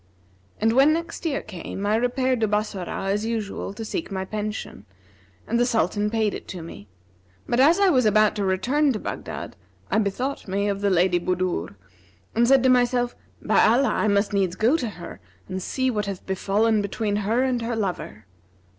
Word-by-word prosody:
And 225 +1 +2
when 275 +5 +5
next 335 +1 -3
year 280 -3 -2
came, 195 0 -6
I 210 +1 +2
repaired 250 +2 +1
to 220 - +3
Bassorah, 200 -2 -2
as 205 +1 0
usual, 220 -4 -3
to 225 - -6
seek 330 - -4
my 190 -1 -3
pension, 210 - -5 0.6
and 235 +2 0
the - - +4
Sultan 210 -2 +1
paid 220 -2 0
it - - -7
to 180 -3 -7
me; 105 -11 -10 0.6
but, 240 - 0
as 315 +8 +5
I 400 -1 +5
was 255 -9 +3
about 215 0 +4
to 205 - -1
return 250 +11 +2
to 215 - -3
Baghdad, - - -6 0.4
I - - +3
bethought 245 +7 -2
me 200 +2 -1
of 200 0 -2
the 200 - +2
Lady 180 -1 +3
Budur 175 - -2 0.6
and 235 +1 +3
said 265 -1 +5
to 260 - +4
myself, 245 -1 +2 0.3
'By - - +4
Allah, 250 +5 +4
I - - +1
must 200 0 +1
needs 190 -3 +1
go 225 +9 +3
to 250 -8 -1
her 175 -3 -10 0.3
and 185 0 -4
see 260 +6 -1
what 210 -3 -2
hath 195 -2 -6
befallen 205 +3 +1
between 205 +1 -2
her 220 +5 +1
and 255 -2 0
her 230 0 -2
lover!' 180 - -4
215 Hz, 190 wpm, -24 LUFS, 195-245 Hz, 0.6 s, when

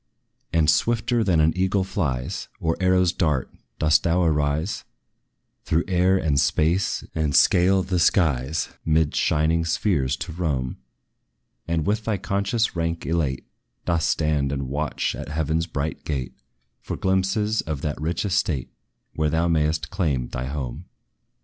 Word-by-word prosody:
And, 80 -2 +2
swifter 115 - +2
than 90 -6 +2
an 80 +1 +4
eagle 95 +1 +1
flies, 70 -10 -2
Or 80 0 0
arrows 90 -1 +3
dart, 75 -8 0 0.3
dost 75 +1 +4
thou 85 +2 +2
arise 75 +3 0 0.8
Through 80 +1 +1
air 95 +1 +3
and 75 -6 +1
space, 85 +7 +1
and 75 -3 0
scale 95 +1 +4
the 90 -1 -1
skies, 80 -4 +2
'Mid 80 -1 +2
shining 80 +2 +2
spheres 80 -6 0
to 80 +6 -6
roam: 75 -7 -2 0.9
And 80 -2 0
with 105 +3 0
thy 110 -3 0
conscious 100 +3 -1
rank 85 0 -2
elate, 80 -6 -1 0.4
Dost 85 -2 +1
stand 75 -3 +1
and 70 -2 -3
watch 75 +2 -1
at - - -7
heaven's 80 +2 -1
bright 75 -2 -4
gate, 65 -5 -3 0.5
For - - -5
glimpses 95 +3 +1
of 75 -3 -4
that 75 -1 -3
rich 85 +5 -1
estate 85 -8 -1 0.4
Where 75 -1 0
thou 80 +3 +1
may'st 75 -2 0
claim 75 -10 -1
thy 60 +1 -4
home. 65 -3 -5
80 Hz, 145 wpm, -24 LUFS, 75-90 Hz, 0.9 s, an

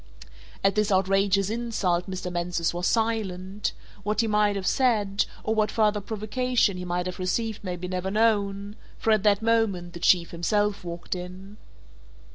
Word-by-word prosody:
At 195 0 +4
this 210 0 +1
outrageous 195 +1 +2
insult 210 -6 -1
Mr. 185 -1 -4
Mansus 175 -1 -1
was 175 +1 -1
silent; 205 -4 -1 0.3
what 210 +2 0
he 225 - 0
might 210 -1 +2
have 195 -1 -3
said, 210 -6 +2 0.2
or 220 - 0
what 215 -1 +2
further 210 -2 +2
provocation 220 +1 0
he 180 - -5
might 180 0 -1
have 185 0 -5
received 215 +4 -2
may 180 -2 -3
be 180 +1 -6
never 185 +1 -2
known, 205 -1 +1 0.2
for 225 - +1
at 215 -2 +4
that 205 +1 +3
moment, 210 -7 +1
the 170 - -7
Chief 170 0 +3
himself 205 +4 0
walked 170 -1 -5
in. 185 +3 -8
200 Hz, 165 wpm, -26 LUFS, 180-215 Hz, 0.3 s, At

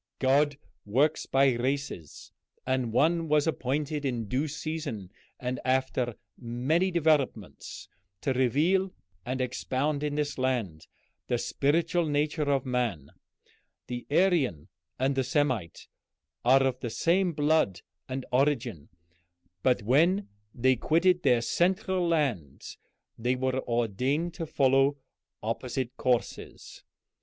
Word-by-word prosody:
God 140 +2 +2 0.3
works 140 +9 +1
by 135 -1 +4
races, 130 - -4 0.3
and 130 -3 0
one 165 +7 +2
was 150 -1 +3
appointed 150 0 -1
in 120 -5 -2
due 135 +8 0
season 150 - -5 0.3
and 125 0 -3
after 130 -2 0 0.2
many 130 +10 0
developments 150 - -1 0.3
to 135 - 0
reveal 155 +10 +2 0.4
and 130 +1 -2
expound 130 +3 -1
in 150 -1 -2
this 150 -2 -2
land 115 -12 -1 0.4
the 120 - +1
spiritual 165 +7 +1
nature 150 0 0
of 135 -2 +1
man. 120 - -2 0.7
The 120 -1 -6
Aryan 145 - +2 0.3
and 135 +2 +1
the 135 -1 0
Semite 130 - -1 0.6
are 135 +2 +5
of 130 -1 0
the 120 - -4
same 175 +9 +2
blood 145 - +1 0.3
and 130 0 -4
origin, 125 - 0 0.7
but 125 -2 +2
when 170 - +3 0.2
they 130 +2 +2
quitted 175 +7 +3
their 125 -6 +3
central 185 - +1
land 130 - -1 0.6
they 125 +3 +1
were 130 0 -1
ordained 125 - 0
to 165 -2 -5
follow 135 0 +3 0.5
opposite 125 +3 -3
courses. 125 -2 -2
135 Hz, 115 wpm, -28 LUFS, 125-150 Hz, 0.7 s, are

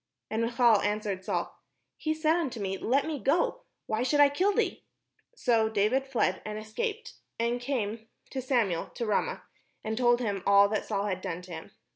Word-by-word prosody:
And 220 +1 0
Michal 230 -2 +4
answered 205 -2 -2
Saul, - - -2 0.4
"He 310 -1 -2
said 315 +1 +2
unto 280 -9 -2
me. 195 -1 -2
Let 260 +8 +1
me 310 -3 -3
go; 335 - +1 0.2
why 220 +1 -1
should 260 +4 +1
I 290 -1 +8
kill 365 +8 +2
thee?" - - -1 0.5
So 230 - +2
David 220 +6 +1
fled, 235 -8 0
and 215 0 -5
escaped, 445 - -4 0.3
and 235 +1 0
came 230 -4 -3 0.2
to 265 - -3
Samuel 235 -10 0
to 235 - -2
Ramah, 215 - -1 0.4
and 220 0 -2
told 240 0 +3
him 205 -5 -2
all 200 0 +6
that 215 - -1
Saul 200 -2 -1
had 185 -3 -2
done 180 -2 -4
to 180 - -12
him. 160 -1 -8
230 Hz, 185 wpm, -29 LUFS, 205-270 Hz, 0.5 s, I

